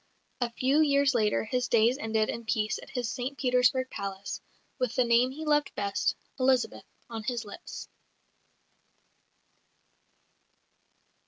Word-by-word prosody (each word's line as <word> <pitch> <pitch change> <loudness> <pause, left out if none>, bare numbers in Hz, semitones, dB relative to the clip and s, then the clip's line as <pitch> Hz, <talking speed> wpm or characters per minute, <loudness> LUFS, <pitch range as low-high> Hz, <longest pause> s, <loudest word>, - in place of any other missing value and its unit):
A 245 -2 0
few 265 +5 +2
years 280 -2 +4
later 215 -3 +2
his 250 +3 -1
days 235 +3 +3
ended 220 -2 +1
in 235 - -4
peace 215 -1 0
at - - -12
his 245 -3 -2
St 255 +4 -4
Petersburg 250 0 +2
palace, 195 0 -5 0.4
with 250 -3 -1
the 255 - +4
name 235 +1 +4
he 305 +4 -7
loved 295 -1 +2
best, 200 -1 0 0.2
"Elizabeth," 255 -1 +2 0.2
on 225 -2 -5
his 235 +1 -3
lips. 205 - -8
245 Hz, 130 wpm, -29 LUFS, 220-260 Hz, 0.4 s, years